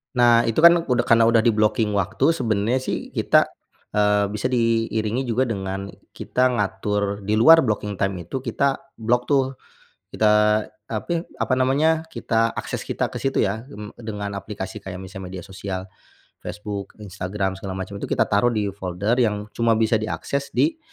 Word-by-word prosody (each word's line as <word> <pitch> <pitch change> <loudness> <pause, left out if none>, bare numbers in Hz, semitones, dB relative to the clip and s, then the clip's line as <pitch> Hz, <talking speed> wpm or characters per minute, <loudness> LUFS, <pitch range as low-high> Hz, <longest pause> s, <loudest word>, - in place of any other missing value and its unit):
Nah, 120 -1 +5
itu 115 - 0
kan 170 +1 +8
udah 125 -5 0
karena 115 0 +5
udah 115 0 +5
di-blocking 110 -1 +2
waktu. 100 - +1
Sebenarnya, 115 +1 0
sih - - -3
kita, - - +4 0.5
eee, 105 -1 +3
bisa 105 +5 -3
diiringi 115 0 0
juga 125 +1 0
dengan 95 -2 -4 0.2
kita 125 0 0
ngatur 105 -2 -1
di 105 +2 +1
luar 160 +7 +8
blocking 105 -3 -2
time 95 -3 -2
itu, 130 +7 -4
kita 140 -1 +1 0.2
block 120 +2 +1
tuh, 135 -1 +1 0.6
kita, 110 - +2 0.6
api 165 +10 -2 0.2
apa - - 0
namanya, 150 +5 +2
kita 115 -4 0
akses - - -5
kita - - -2
ke - - -7
situ 135 - 0
ya, 110 +3 0
mmm, 105 -4 -9
dengan 105 -3 -5
aplikasi 100 -1 -6
kayak 95 -1 -7
misalnya 95 -1 -8
media 85 - -10
sosial 95 -1 -6 0.5
Facebook, 105 -1 -6
Instagram, 95 0 -3
segala 95 -1 -6
macam, 95 +1 -6
itu - - -4
kita - - +1
taruh 105 +4 +3
di 105 -2 0
folder 100 +5 -2
yang 105 -3 +1
cuma 115 0 +2
bisa 110 0 +2
diakses 140 +6 -4
di 320 +1 +2
110 Hz, 165 wpm, -23 LUFS, 100-120 Hz, 0.6 s, kan